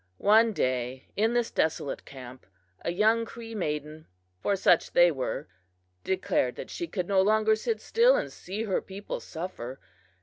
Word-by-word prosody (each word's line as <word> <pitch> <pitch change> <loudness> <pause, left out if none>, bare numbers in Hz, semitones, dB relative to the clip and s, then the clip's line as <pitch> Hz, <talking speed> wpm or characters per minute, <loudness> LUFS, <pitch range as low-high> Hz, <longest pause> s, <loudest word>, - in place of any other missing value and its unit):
One 220 +2 +5
day 130 - -2
in 220 +3 +2
this 240 -1 +1
desolate 155 -3 -1
camp 130 -2 -11 0.3
a - - -2
young 220 +5 +3
Cree 230 0 -9
maiden 155 -5 -4 0.3
for 200 - +1
such 180 -3 +3
they 175 0 +6
were 135 0 -3 0.6
declared 185 -9 0
that - - -8
she 345 - -4
could 180 - -3
no 195 -1 +4
longer 215 +2 +3
sit 435 - -2
still 485 +2 +4
and - - -2
see 200 +5 -5
her 195 -4 0
people 195 +1 -6
suffer. 150 -7 -7
190 Hz, 160 wpm, -28 LUFS, 150-220 Hz, 0.6 s, they